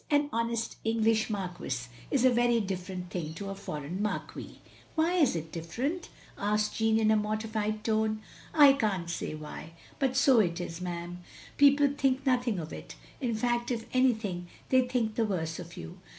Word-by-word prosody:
An 290 -1 +2
honest 230 0 -1
English 225 0 +2
marquis 180 - -3 0.2
is 260 -2 +2
a 255 - +7
very 240 -1 +3
different 185 -2 -4
thing 160 -3 -4
to 195 +3 -5
a - - -3
foreign 175 -2 -5
marquee. 210 - -4 0.2
" - - -26
"Why 325 +2 +2
is 310 - +3
it 160 -1 -4
different?" 255 - -3 0.3
asked 210 +1 +1
Jeaime, 220 0 +3
in 215 0 +4
a - - +5
mor 210 0 0
tified 215 -1 -2
tone. 220 -1 0 0.3
"I 290 -3 +8
can't 195 -10 -1
say 160 - -3
why, 155 +1 -8 0.3
but 265 -2 +1
so 265 -3 +6
it 175 -4 +1
is, 175 -1 -5
'm. 175 0 -5 0.4
People 285 0 +6
think 270 -1 +1
nothing 245 -5 +2
of 160 -2 -5
it. - - -9 0.2
In 240 -4 -1
fact, 240 +1 0
if 230 -3 -2
anything, 220 -9 +1 0.2
they 255 -1 +4
think 240 -4 0
the 230 - +1
worse 160 -6 -2
of 175 -1 -9
you. 180 +2 -8
215 Hz, 180 wpm, -30 LUFS, 180-245 Hz, 0.4 s, I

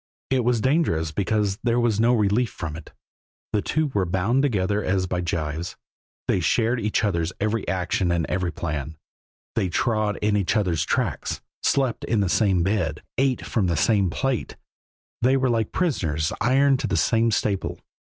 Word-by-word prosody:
It 130 -2 +2
was 120 -1 +1
dangerous 130 - +1
because 100 +3 0
there 120 0 +1
was 115 -3 +1
no 120 +2 +4
relief 110 +2 +2
from 80 -3 -6
it: 80 - -10 0.6
the 105 - +2
two 155 +3 -1
were 95 -3 +1
bound 95 +9 +1
together 105 -6 0
as 95 0 +1
by 90 0 -2
gyves; 80 -1 -3 0.5
they - - +2
shared 115 +7 +1
each 105 0 0
other's 85 -5 0
every 110 +1 -1
action 90 0 0
and 85 -2 +1
every 90 -1 -1
plan; 75 -1 -4 0.6
they 95 - 0
trod 110 +2 0
in 105 0 +1
each 100 +2 +1
other's 90 -7 +1
tracks, - - -1 0.2
slept 135 -4 +1
in 115 - +1
the 100 -3 +1
same 95 -4 +2
bed, 95 -3 -1 0.2
ate 135 -2 +1
from 105 -6 0
the 85 -2 0
same 100 +1 +3
plate. 135 +5 -2 0.7
They 130 +3 +4
were 130 -2 +1
like 115 -2 0
prisoners 80 - 0
ironed 135 +1 +3
to - - -2
the - - 0
same 115 -1 +3
staple. 105 -3 -1
105 Hz, 170 wpm, -24 LUFS, 90-120 Hz, 0.7 s, no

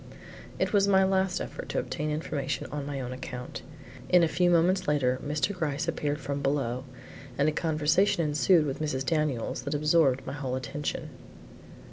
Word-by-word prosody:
It - - -1
was 200 -1 +4
my 190 -1 +5
last 190 -1 +1
effort - - -6
to - - 0
obtain 155 0 -3
information 150 -2 -2
on 145 -1 -4
my 140 -1 -3
own 125 -1 -4
account. 125 -1 -7 0.5
In 180 -1 +6
a - - +4
few 175 +2 +2
moments 175 +2 +3
later 130 -4 +2
Mr. 150 +7 0
Gryce 150 -6 -2
appeared 145 0 -1
from 140 0 -3
below, 135 -3 -1 0.5
and 140 - +3
a - - +3
conversation 160 +3 +2
ensued 155 +2 +4
with 140 +1 -3
Mrs. 135 -3 -1
Daniels 150 -8 -1
that 140 +4 -3
absorbed 150 -3 +3
my 135 - -5
whole 135 -3 -3
attention. 130 +3 -4
150 Hz, 170 wpm, -28 LUFS, 135-165 Hz, 0.5 s, In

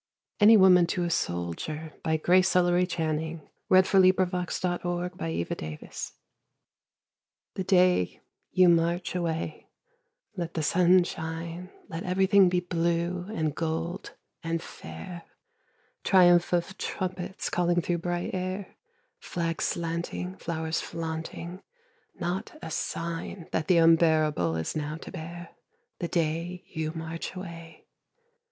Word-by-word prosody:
ANY 220 +1 +8
WOMAN 180 -3 +7
TO 175 +1 -1
A 170 - -1
SOLDIER 150 - -3 0.3
GRACE 185 +1 +4
ELLERY 180 0 +4
CHANNING 160 -2 -3 0.2
[Sidenote: 185 0 +6
1917, 180 -1 -1 0.2
1918] 80 - -5 1.4
The 190 - -3
day 180 - +3 0.3
you 185 -1 +5
march 170 +1 +2
away 165 -3 -3 0.7
let 170 -3 -4
the 160 - -1
sun 180 +3 +5
shine, 165 +2 -5 0.2
Let 165 - -5
everything 190 +1 +4
be 180 0 +1
blue 170 +1 -1
and 155 -7 -1
gold 165 +3 -3 0.3
and 165 0 -1
fair, 175 +1 -9 0.8
Triumph 175 -2 +5
of 175 +2 -1
trumpets 185 0 -3
calling 175 0 +2
through 175 0 -1
bright 175 +1 -2
air, 185 +1 -4 0.4
Flags 165 -1 -2
slanting, 170 +2 -3
flowers 160 -1 -2
flaunting 165 +2 -5 0.5
not 185 - -4
a - - -6
sign 165 +2 -4
That 160 - -1
the 180 -2 +5
unbearable 160 - +4
is 80 0 -3
now 150 0 -3
to - - -10
bear, 175 0 -7 0.5
The 170 - -2
day 170 +2 -1
you 160 -1 -3
march 165 +2 -5
away. 170 -3 -9
170 Hz, 115 wpm, -28 LUFS, 160-180 Hz, 1.4 s, ANY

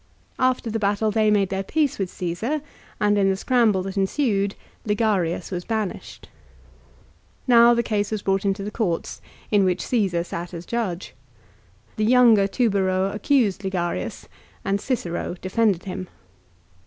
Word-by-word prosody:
After 255 -3 +1
the 225 - -1
battle 210 +1 +1
they 215 0 +2
made 200 -3 +2
their 195 0 -2
peace 295 +6 0
with 190 -2 -1
Caesar, 200 - -3 0.4
and 205 0 +2
in 195 -1 +3
the 190 - +1
scramble 215 -3 +2
that 195 +1 -6
ensued 200 -1 0 0.3
Ligarius 200 -6 0
was 180 -1 -3
banished. 220 -3 -4 1.2
Now 235 -1 +6
the 235 - +1
case 205 -2 -1
was 215 -2 -3
brought 195 0 +1
into 195 0 -1
the 205 - -5
courts, 195 -7 -2 0.3
in 205 -2 +4
which 185 -1 0
Csesar 190 -8 0
sat 175 0 -6
as 170 +1 -7
judge. 205 -7 -3 0.8
The 215 - +1
younger 230 -4 +5
Tubero 195 -3 +1
accused 210 -3 +1
Ligarius, 175 - -3 0.4
and 200 +1 0
Cicero 180 -9 -3
defended 195 -1 +1
him. 185 -1 -6
200 Hz, 145 wpm, -23 LUFS, 185-225 Hz, 1.2 s, Now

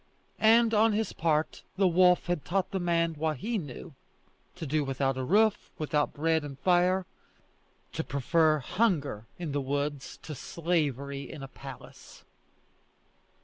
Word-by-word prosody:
and 225 +1 +5
on 220 +1 +4
his 220 +1 -1
part, 155 -1 0 0.2
the 195 -1 +4
wolf 180 0 +4
had 175 -4 -1
taught 185 +2 -1
the 190 - -1
man 170 -1 +1
what 155 -1 -2
he 225 - -2
knew 145 0 -9 0.6
to 175 -3 -6
do 150 +1 0
without 135 0 -1
a 130 - -3
roof, 210 +8 +2
without 150 -1 0
bread 160 +1 +1
and 140 -2 -7
fire, 180 +3 +2 0.9
to - - -2
prefer 155 +4 +2
hunger 145 - -1
in 170 -4 -4
the 140 0 -1
woods 140 +1 -3
to 155 - -6
slavery 140 -3 -2
in 150 -4 -8
a - - -6
palace. 135 -1 -12
160 Hz, 145 wpm, -29 LUFS, 140-180 Hz, 0.9 s, and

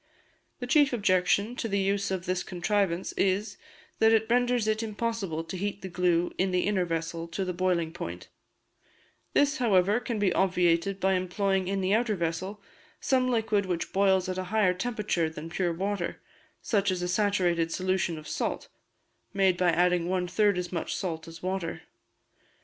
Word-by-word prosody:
The 250 - -4
chief 280 +1 +4
objection 200 +1 +2
to 230 - -2
the 200 -2 0
use 200 0 0
of 185 -2 -3
this 185 0 -1
contrivance 185 -1 -1
is, 195 +3 0 0.4
that 220 0 +5
it 220 -1 +3
renders 245 -2 +2
it 215 0 +1
impossible 215 -6 -3
to 165 +3 -7
heat 200 +2 -4
the 190 - -5
glue 175 -1 +1
in 190 +1 +2
the 180 -1 +1
inner 195 -3 +1
vessel 165 0 -3
to 185 +3 -3
the 180 - -2
boiling 175 -2 0
point; 90 - -7 1.1
this, 285 +1 +3
however, 205 -3 +3
can 235 -2 -3
be 205 -3 +2
obviated 180 0 +2
by 190 0 +2
employing 190 +1 0
in 195 0 -1
the 190 +1 +1
outer 225 -1 +2
vessel 185 +4 -3 0.4
some 255 -1 +1
liquid 220 -4 +1
which 175 -2 -3
boils 190 -1 +3
at 185 0 -3
a 185 - -3
higher 200 -1 +2
temperature 200 -5 -1
than 160 +1 -8
pure 175 -1 0
water, 190 +1 -3 0.4
such 200 -3 +1
as 180 -1 -1
a - - -1
saturated 180 -4 +1
solution 185 -2 -1
of 155 -1 -10
salt - - -3 0.7
(made 190 -2 +3
by 180 0 +2
adding 175 0 +2
one 180 -1 0
third 200 +2 +2
as 180 -1 -3
much 170 -3 -3
salt 165 -3 -4
as 165 0 -11
water). 185 -3 -3
185 Hz, 175 wpm, -28 LUFS, 175-205 Hz, 1.1 s, that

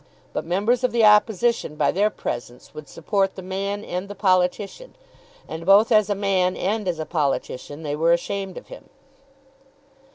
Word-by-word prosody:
But - - -3
members 210 +8 +1
of 250 - +2
the 230 -1 +3
Opposition, 210 -3 +3
by - - +2
their 205 +3 +2
presence, 120 - -7
would 155 -2 -10
support 195 +4 -1
the 190 - -8
man 200 +2 -4
and 180 +2 -4
the 205 - -8
politician, 195 - 0 0.5
and 160 - -6
both 200 +6 +5
as 215 -2 +4
a 205 - +1
man 190 -2 0
and 210 +2 -2
as 175 -2 -1
a 155 - -4
politician 145 -1 -3
they 145 -1 -2
were 165 +2 +2
ashamed 190 +2 -2
of - - -11
him. - - -12
195 Hz, 170 wpm, -23 LUFS, 170-210 Hz, 0.5 s, both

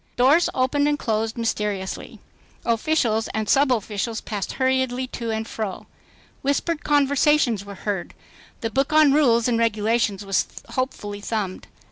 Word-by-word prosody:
Doors 280 +8 +4
opened 275 +3 +2
and 295 0 +1
closed 225 -2 -1
mysteriously. 210 -4 -3 0.5
Officials 230 -2 +1
and 220 0 0
subofficials 230 -5 +1
passed 205 -3 -3
hurriedly 260 -1 0
to 235 -2 -5
and 220 0 -2
fro. 215 -4 -5 0.6
Whispered 295 +3 -1
conversations 285 -5 +3
were 200 0 -9
heard. 195 -2 -4 0.5
The 225 - -2
book 270 +5 0
on 305 -2 +6
rules 240 -6 +4
and 235 -2 +1
regulations 220 -2 +1
was 195 -1 +1 0.2
hopefully 205 -6 -3
thumbed. 205 -4 -3
230 Hz, 130 wpm, -23 LUFS, 215-270 Hz, 0.6 s, on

